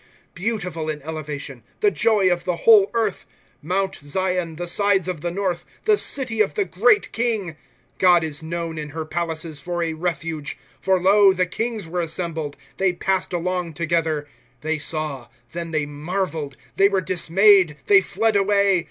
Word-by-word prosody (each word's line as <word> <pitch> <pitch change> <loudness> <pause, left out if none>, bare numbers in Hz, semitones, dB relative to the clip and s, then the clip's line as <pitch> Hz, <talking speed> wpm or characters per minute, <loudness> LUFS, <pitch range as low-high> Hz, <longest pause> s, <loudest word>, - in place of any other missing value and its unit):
* - - -36
Beautiful 180 -5 -3
in 150 -1 -3
elevation, 150 -4 -6 0.2
the 415 - +3
joy 215 - +2
of 175 - -5
the 180 - -1
whole 210 -3 +7
earth, 220 -5 -1 0.3
Mount 190 +5 -1
Zion, 180 +2 -2
the 175 +2 -4
sides 195 +1 +2
of 180 -5 -4
the 175 - -2
north. 180 -1 -2 0.2
The 430 - +5
city 255 - 0
of 210 - +1
the 415 -2 +1
great 435 0 +2
King! 220 -8 -1 0.2
' - - -39
God 175 -2 +5
is 155 -1 -4
known 165 0 -4
in 150 -1 -6
her 160 - -3
palaces 160 -2 -4
for 175 +2 -2
a 165 -1 -2
refuge. 165 -2 -4
* 135 -2 -31
For 190 -1 +2
lo, 195 +1 +5
the 185 -1 +1
kings 220 +1 -3
were 175 +2 -3
assembled, 165 -3 -3 0.2
They 190 -1 +2
passed 190 +1 -1
along 180 -1 -2
together. 160 -3 -1 0.2
* 120 0 -37
They 155 0 -1
saw; 150 -5 -3 0.2
then 170 0 -5
they 155 -3 -1
marveled; 155 -1 -4 0.2
They 195 0 +5
wore 195 -2 +1
dismayed, 185 -1 +4
they 200 -1 +6
fled 210 +3 0
away. 200 -1 +3
175 Hz, 180 wpm, -22 LUFS, 160-195 Hz, 0.3 s, whole